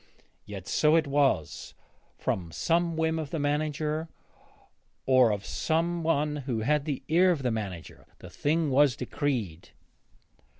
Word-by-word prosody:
Yet 100 -3 -8
so 155 +1 +3
it 165 -1 +3
was; 140 - 0 0.4
from 85 -3 -3
some 170 - 0
whim 160 0 0
of 155 -3 -5
the 165 - -3
manager, 150 +2 -1 1.0
or 130 -3 +5
of 100 -2 -2
some 170 +2 -1
one 150 -2 0
who 125 -5 -3
had 150 +5 +1
the 145 -4 -3
ear 175 +4 +4
of 160 -6 0
the 125 - +1
manager, 100 -7 -6
the - - -12
thing 155 0 0
was 135 -1 +4
decreed. 120 - -3
145 Hz, 140 wpm, -28 LUFS, 125-160 Hz, 1.0 s, or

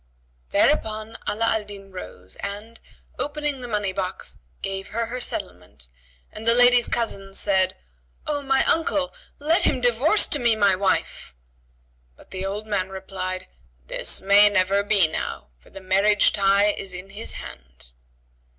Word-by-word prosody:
Thereupon 215 - +1
Ala 225 +2 0
al 220 -1 +1
Din 200 -1 -11
rose 95 - -9
and, 210 +3 -7 0.4
opening 290 -2 -1
the 245 - -6
money 205 -4 -1
box, 185 -1 -3 0.2
gave 195 0 -4
her 230 +1 -2
her 250 +2 -5
settlement 90 - -4 0.4
and 220 +1 -8
the 230 - +6
lady's 245 0 +6
cousin 195 -4 -2
said, 190 -2 +2 0.5
"O 290 -1 -1
my 270 -1 +2
uncle, 300 -4 +1 0.2
let 320 +4 +2
him 260 - +2
divorce 250 - +3
to 295 - +1
me 235 -3 +3
my 200 -2 +4
wife;" 190 - -1 0.8
but - - -19
the 190 0 -5
old 200 +2 -4
man 200 -3 -1
replied, 190 -1 -5 0.4
"This - - -1
may 200 +2 +6
never 195 0 +2
be 200 -4 +3
now; 155 - -5
for 60 - -21
the - - -10
marriage 195 +2 +3
tie 200 +1 +3
is 195 -2 -7
in 185 +2 -9
his 210 +3 -6
hand." - - -10
205 Hz, 150 wpm, -23 LUFS, 190-230 Hz, 0.8 s, the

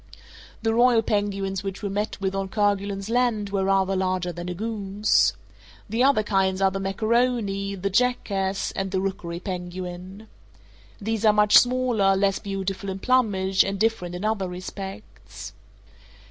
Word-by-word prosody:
The 225 0 +1
royal 240 -1 +4
penguins 200 -2 -1
which 195 +1 -6
we 200 - -1
met 205 +2 -3
with 190 -1 -1
on 195 0 -2
Kerguelen's 200 -1 0
Land 230 -4 0
were 195 -1 0
rather 195 0 +2
larger 185 -1 -1
than 175 +1 -6
a 180 - -4
goose. 210 0 +1 0.5
The 225 +4 0
other 265 -5 +4
kinds 190 -2 +1
are 195 -1 +3
the 195 - -3
macaroni, 200 0 0
the 195 +1 -3
jackass, 195 -4 0
and 195 0 -3
the 190 0 -1
rookery 185 -3 -4
penguin. 180 +2 -6 0.7
These 220 +1 -2
are 215 -1 +6
much 210 0 +4
smaller, 245 -6 +4
less 195 0 +1
beautiful 195 0 -4
in 190 - -3
plumage, 195 -5 +2
and 195 0 -3
different 205 -5 0
in 180 +4 -4
other 210 -4 -1
respects. 105 - -8
195 Hz, 150 wpm, -24 LUFS, 190-215 Hz, 0.7 s, are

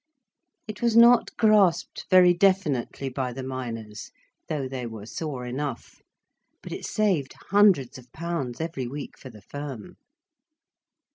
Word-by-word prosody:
It 215 - -8
was 235 -1 +2
not 235 0 +7
grasped 205 -6 +3
very 180 -1 +7
definitely 170 -9 +1
by 130 -1 -3
the 130 +2 -6
miners, 115 -5 -6 0.4
though 145 -4 -2
they 130 -2 -5
were 110 -2 -8
sore 135 0 -5
enough. 130 +1 -5 0.6
But - - -9
it - - -6
saved 185 -11 0 0.2
hundreds 185 - +4
of 125 -1 -18
pounds 160 -7 -4
every 160 -6 -3
week 140 +3 -7
for 130 - -12
the 105 -4 -15
firm. 140 -5 -8
140 Hz, 135 wpm, -25 LUFS, 125-185 Hz, 0.6 s, not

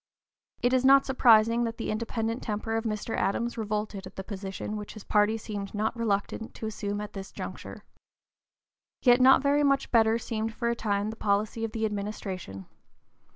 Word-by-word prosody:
It 245 +1 +3
is 255 -1 +3
not 275 +1 +6
surprising 230 -2 +5
that 230 0 -4
the 225 - -3
independent 225 +2 -2
temper 220 0 -3
of 225 +1 -1
Mr. 215 0 -2
Adams 235 +4 -1
revolted 210 -3 -3
at 185 - -14
the 190 - -5
position 195 +1 -5
which 210 +1 -7
his 215 - -9
party 210 +1 +2
seemed 205 -2 -6
not 215 +2 -1
reluctant 220 0 -2
to - - -6
assume 205 -1 -3
at 210 0 -6
this 195 -1 -7
juncture. - - -8 1.2
Yet 245 0 +6
not 265 +2 +7
very 285 +1 +3
much 275 -1 +2
better 225 -1 +4
seemed 225 -1 -3
for 235 -1 -1
a 235 - 0
time 205 -2 -1
the - - -8
policy 215 +1 0
of 225 - -2
the 225 0 -1
administration. 195 - -5
220 Hz, 180 wpm, -28 LUFS, 205-230 Hz, 1.2 s, not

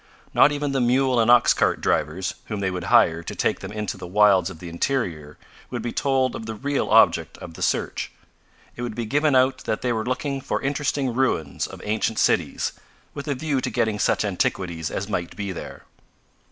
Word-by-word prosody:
Not 145 - +6
even 145 -1 -2
the 135 -1 0
mule 125 +1 +2
and 115 0 +3
ox 120 -1 +6
cart - - +1
drivers, 90 +7 0
whom 105 -2 -4
they 95 -1 -1
would 90 -1 -4
hire 80 +1 +4
to - - -7
take - - 0
them - - -7
into 105 -2 -4
the 90 -1 -8
wilds 95 -2 +4
of 95 - -9
the 85 - -9
interior 85 - -2 0.3
would - - -4
be 120 - -2
told 130 -3 +1
of 110 - -7
the 110 - -4
real 140 +5 -1
object - - +4
of 85 - -10
the - - -11
search. - - -1 0.6
It - - -7
would 120 -3 -4
be 115 - -3
given 145 +5 +2
out 130 +1 +3
that 110 - -2
they 125 -1 +1
were 110 -1 -1
looking 135 +3 -2
for - - -2
interesting 140 -2 -1
ruins 115 - 0
of - - -11
ancient 110 +1 -1
cities, - - +1 0.4
with 140 - -7
a 145 - 0
view 140 -1 -1
to 125 - -2
getting 110 -3 0
such - - +1
antiquities 90 -4 -1
as 100 - -4
might 90 -5 -3
be 100 -2 -4
there. 90 - -8
110 Hz, 205 wpm, -23 LUFS, 95-130 Hz, 0.6 s, Not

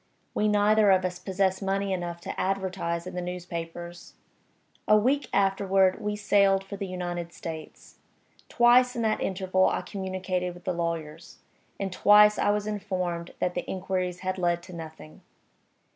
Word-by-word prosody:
We 215 - +1
neither 210 0 +4
of 185 -1 +4
us 180 -1 -3
possessed 190 -1 0
money 195 0 -1
enough 175 -2 -4
to - - -6
advertise 185 -3 -2
in 185 - -7
the 180 - -3
newspapers. 175 -1 -7 0.7
A 215 - +6
week 265 +7 +1
afterward 195 -1 +2
we 210 0 -2
sailed 200 -2 +3
for 195 +1 -8
the 195 0 -5
United 175 -2 -4
States. 160 -2 -9 0.5
Twice 250 +1 +5
in 235 - -1
that 220 -1 0
interval 185 0 +1
I - - -1
communicated 185 -2 -3
with 175 - -14
the 185 - -1
lawyers; 165 -2 -4 0.4
and 195 -2 -3
twice 210 +2 +6
I - - +2
was 205 0 +1
informed 185 -5 -3
that 180 - -1
the 180 - -4
inquiries 185 -1 -3
had 185 0 -3
led 175 -1 0
to 185 - -11
nothing. 155 - -10
185 Hz, 160 wpm, -27 LUFS, 175-200 Hz, 0.7 s, A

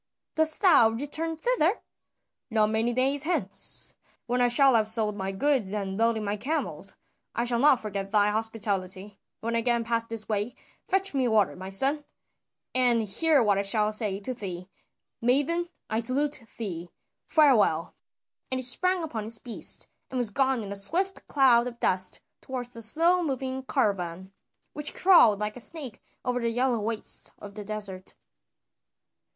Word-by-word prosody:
"Dost 315 0 +3
thou 310 - +6
return 295 +7 -3
thither?" 430 -1 +1 0.7
"Not 215 -2 +2
many 225 +2 +1
days 265 +3 +1
hence, 345 +5 +2 0.3
when 245 +1 0
I 245 - +4
shall 265 +2 +5
have 220 -2 +3
sold 220 -2 +4
my 195 -1 -3
goods 215 -1 0
and 195 -2 -3
loaded 225 0 +1
my 205 0 -2
camels. 300 +9 -3 0.4
I 235 - 0
shall 240 -1 +1
not 275 -1 +5
forget 200 -2 -4
thy 205 0 +3
hospitality; 205 -3 -3 0.2
when 230 +1 -2
I - - +2
again 235 0 +1
pass 230 0 -1
this 225 -2 -3
way 215 +2 -2 0.3
fetch 385 -1 0
me 265 -3 +1
water, 215 -4 +2
my 190 +1 -8
son, 275 +9 +1 0.7
and 245 -3 +3
hear 285 +7 +2
what 205 -2 +2
I - - +2
shall 210 +1 +3
say 210 -3 +1
to 255 +6 -3
thee. 185 -5 -7 0.5
Maiden, 290 +8 +1 0.2
I 220 - -1
salute 265 +2 +1
thee! 175 -6 -5 0.4
Farewell." 230 - +3 0.6
And 260 - -2
he 255 - -4
sprang 365 +8 +1
upon 235 -9 -4
his 225 +1 -3
beast 235 0 -4 0.2
and 260 - -4
was 240 -4 -1
gone 265 0 +1
in 200 - -7
a - - -4
swift 355 - -1
cloud 250 -4 +4
of 235 -1 -8
dust 185 0 +1 0.2
toward 255 -2 -5
the 230 - -5
slow 330 +10 +3
moving 265 -4 -3
caravan, 190 - -1 0.4
which 295 +1 -4
crawled 340 - +6
like 210 0 -3
a - - -9
snake 270 -2 -6 0.2
over 245 0 0
the 235 -1 -1
yellow 245 0 0
wastes 215 +1 -4
of 200 -1 -11
the 210 0 -7
desert. 200 -3 -5
230 Hz, 165 wpm, -27 LUFS, 210-270 Hz, 0.7 s, thou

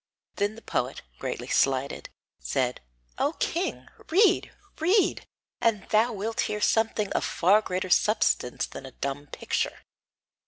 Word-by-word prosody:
Then 205 +1 0
the 225 - -13
poet, - - -2 0.2
greatly - - -4
slighted, 135 0 +1 0.3
said: 125 - -1 0.4
"O - - +1
king, 125 +1 -2 0.2
read, 385 +3 +4 0.3
read, 360 +4 +2 0.3
and 215 -4 +1
thou 225 +3 +4
wilt 220 +1 -4
hear 210 - -2
something 220 -1 +1
of - - 0
far 195 +5 +4
greater 185 -2 -3
substance 210 - +2
than 135 - -9
a 130 - -12
dumb 140 +1 -4
picture!" - - -2
205 Hz, 130 wpm, -27 LUFS, 140-225 Hz, 0.4 s, read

